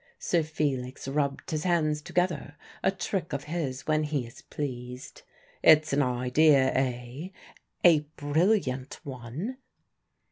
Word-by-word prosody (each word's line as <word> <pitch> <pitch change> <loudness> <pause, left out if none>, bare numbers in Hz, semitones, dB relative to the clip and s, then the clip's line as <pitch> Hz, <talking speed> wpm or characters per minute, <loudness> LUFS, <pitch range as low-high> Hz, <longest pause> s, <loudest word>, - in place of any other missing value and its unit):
Sir 170 - +1
Felix 140 -5 -2
rubbed 140 0 -1
his 155 -1 -1
hands 155 -4 +1
together 165 -3 -1 0.3
a - - +3
trick 190 -3 -3
of 140 0 -2
his 145 -5 -3
when 155 0 +2
he 145 -4 -1
is 115 - -13
pleased. 125 -3 -6 0.4
"It's 155 -2 +6
an 145 - +3
idea, 130 +2 +3
eh?" 125 +4 -2 0.6
"A 170 -4 +7 0.2
brilliant 145 -3 +1
one." 135 - -6
145 Hz, 120 wpm, -28 LUFS, 130-160 Hz, 0.6 s, A